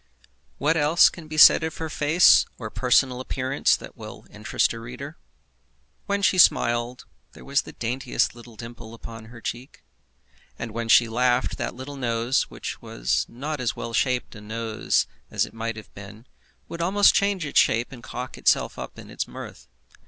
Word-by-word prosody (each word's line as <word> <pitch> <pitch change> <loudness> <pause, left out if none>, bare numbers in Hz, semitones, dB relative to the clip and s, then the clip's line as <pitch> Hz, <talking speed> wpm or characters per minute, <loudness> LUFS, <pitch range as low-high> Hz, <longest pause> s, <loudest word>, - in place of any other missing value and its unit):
What 155 +4 +1
else 160 +2 +5
can 165 -2 -11
be 155 0 -7
said 155 - +8
of 160 0 -4
her 160 - -4
face 155 +3 +5
or 110 -3 -7
personal 125 0 +2
appearance 130 +1 0
that - - -11
will - - -11
interest - - 0
a 115 - -7
reader? 125 +7 -9 0.9
When 200 0 -1
she 185 -1 +3
smiled, 120 -5 +3 0.3
there - - -14
was 140 +1 +1
the - - -11
daintiest 125 +2 -1
little 120 -1 -14
dimple 115 0 -10
on 115 -1 -9
her 115 +1 -13
cheek. 125 +5 -7 0.7
And 115 - -6
when 115 +1 -4
she 115 +1 +6
laughed, 125 +2 0
that - - -3
little 135 +3 -8
nose, 120 0 0
which - - -7
was - - -1
not 145 +5 -5
as 120 - -1
well 115 - -6
shaped 125 0 0
a 110 - -11
nose 110 +1 -1 0.2
as - - 0
it - - -14
might 115 0 -4
have 110 - -12
been, 105 +3 -12 0.4
would 170 - -6
almost 200 +4 +4
change 200 -4 +1
its 145 - +3
shape 115 +2 +2
and 125 -3 -11
cock 125 +1 -7
itself - - +1
up - - -8
in - - -11
its - - -3
mirth. - - -10
125 Hz, 180 wpm, -24 LUFS, 115-145 Hz, 0.9 s, said